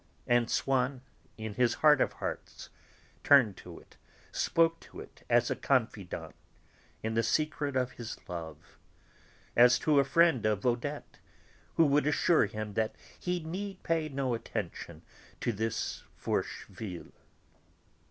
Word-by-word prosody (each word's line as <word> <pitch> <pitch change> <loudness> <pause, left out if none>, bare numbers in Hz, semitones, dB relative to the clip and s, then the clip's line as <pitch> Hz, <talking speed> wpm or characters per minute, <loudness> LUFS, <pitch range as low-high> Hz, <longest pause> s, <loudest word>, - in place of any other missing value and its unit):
And 120 -1 +2
Swann, 130 -1 0 0.4
in 110 -1 -5
his 120 +2 +2
heart 150 -3 +5
of - - +1
hearts, - - -6 0.5
turned 130 -9 +6
to 85 -2 -11
it, - - -21 0.3
spoke 165 0 +2
to - - -13
it - - -12
as - - +4
to - - +2
a - - -9
confidant - - -1 0.7
in 110 0 -1
the 115 - +2
secret 145 +3 0
of 125 -1 +1
his 120 -2 -7
love, 80 -2 -8 0.8
as 120 0 +7
to 145 +2 +3
a - - +5
friend 150 -2 +3
of 105 0 -1
Odette 125 +4 -2 0.6
who 165 - +5
would 145 0 +3
assure 160 +3 +3
him 105 -1 -5
that 110 +1 -1 0.2
he 180 -1 -2
need 190 +4 -5
pay 160 -2 0
no 135 -3 -1
attention 115 - -5 0.4
to 120 - -1
this 110 +2 -2 0.2
Forcheville. 95 -6 -4
125 Hz, 140 wpm, -30 LUFS, 110-150 Hz, 0.8 s, as